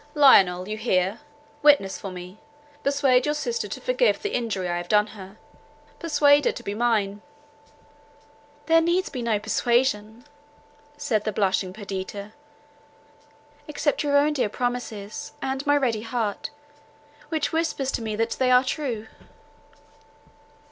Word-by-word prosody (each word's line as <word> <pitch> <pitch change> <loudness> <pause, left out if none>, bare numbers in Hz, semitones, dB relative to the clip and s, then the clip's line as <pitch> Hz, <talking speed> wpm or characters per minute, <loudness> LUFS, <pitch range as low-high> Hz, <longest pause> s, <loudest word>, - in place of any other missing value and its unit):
"Lionel, 190 -11 +5
you 215 +1 -4
hear: 195 -2 0 0.4
witness 290 -10 +4
for 195 - -6
me: 180 +2 -10 0.4
persuade 275 -2 +3
your 295 - +1
sister 465 +10 -2
to - - -6
forgive - - +1
the 415 - -4
injury 205 -6 -2
I 175 0 -1
have 175 0 -5
done 210 +1 +4
her; 200 -1 -12 0.6
persuade 290 -3 +4
her - - +3
to 240 - -9
be 200 - -4
mine." 210 -3 0 1.4
"There 330 0 +5
needs 345 +1 0
no 235 -4 0
persuasion," 235 0 0 0.7
said 250 -8 0
the 215 - -1
blushing 190 -2 0
Perdita, 200 +1 -6 1.3
"except 295 0 -1
your 285 -1 +2
own 295 +1 +3
dear 260 -7 0
promises, 235 -3 -4
and 265 0 -3
my 290 0 +5
ready 240 -6 0
heart, 225 -3 -3 0.8
which 315 -2 -1
whispers 320 -5 -1
to - - -3
me 220 -1 -3
that 225 +1 -1
they 260 -1 +3
are 250 0 +6
true." 255 -6 -3
235 Hz, 135 wpm, -24 LUFS, 205-285 Hz, 1.4 s, are